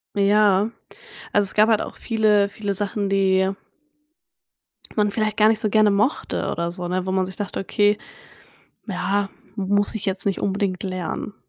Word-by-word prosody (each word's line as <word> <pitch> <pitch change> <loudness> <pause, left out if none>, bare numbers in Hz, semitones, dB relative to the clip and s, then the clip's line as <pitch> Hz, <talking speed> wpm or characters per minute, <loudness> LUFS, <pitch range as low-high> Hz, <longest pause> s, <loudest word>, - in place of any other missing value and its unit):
Ja, 205 0 +3 0.7
also, 205 -1 +4
es - - +2
gab 215 +1 +5
halt 220 -2 +3
auch - - -7
viele 215 -3 +2
viele 200 0 -4
Sachen 200 0 -2
die 190 -1 +2 1.5
man 210 -1 +2
vielleicht 215 -1 -1
gar 215 0 +5
nicht 220 0 +3
so 215 - 0
gerne 215 -1 +4
mochte 210 +8 0
oder 170 0 -2
so, 180 0 -5
ne? 185 +1 -2
Wo 185 - -1
man 190 -1 +1
sich 185 - -9
dachte: 205 -2 -4
„Okay, 205 +2 +2 0.9
ja, 195 +1 -1 0.3
muss 205 +1 +1
ich 220 - -5
jetzt 190 -1 -1
nicht 195 - 0
unbedingt 195 -2 -1
lernen.“ 185 +2 -4
200 Hz, 165 wpm, -22 LUFS, 190-210 Hz, 1.5 s, gab